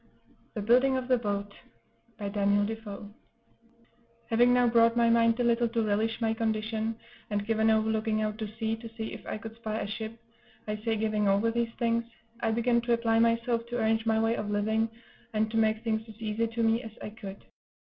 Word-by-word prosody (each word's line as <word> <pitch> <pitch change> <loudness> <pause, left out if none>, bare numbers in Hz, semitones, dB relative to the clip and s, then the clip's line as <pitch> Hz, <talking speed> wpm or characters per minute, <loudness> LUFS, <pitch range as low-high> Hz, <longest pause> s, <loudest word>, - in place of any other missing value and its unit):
THE 210 - -3
BUILDING 255 +4 +4
OF 255 -1 -3
THE 255 -1 +4
BOAT 200 -2 -3 0.6
By 205 -1 -4
Daniel 205 0 +2
Defoe 210 -2 -6 1.2
Having 240 +2 +5
now 245 0 +4
brought 230 0 +4
my 235 -1 +4
mind 230 0 +4
a - - +2
little 235 0 +2
to 230 -1 0
relish 215 +2 0
my 225 -1 +1
condition, 220 0 -1 0.3
and 205 -1 -1
given 220 0 +2
over 220 0 +3
looking 220 0 0
out 215 +1 -3
to 215 - -3
sea, 220 0 -1
to 230 0 -9
see 220 -1 -4
if - - -9
I - - -3
could 225 +1 -9
spy 220 -1 -3
a - - -2
ship 220 +2 -5 0.5
I 210 0 -2
say, 225 +1 -1
giving 215 -1 0
over 200 +4 +3
these 235 0 0
things, 235 -1 +1 0.4
I 230 - 0
began 235 +1 +2
to 235 0 +1
apply 230 -1 +2
myself 230 0 +1
to 240 0 -3
arrange 225 0 +1
my 220 0 +3
way 225 +1 +2
of 210 - -3
living, 220 +2 +1 0.4
and 215 0 0
to 225 - -1
make 220 0 +2
things 220 -1 0
as 220 - -11
easy 225 +1 -1
to 230 +1 -2
me 225 +1 +3
as 225 -3 -9
I 210 - -6
could. 200 -3 -9
225 Hz, 210 wpm, -29 LUFS, 215-230 Hz, 1.2 s, Having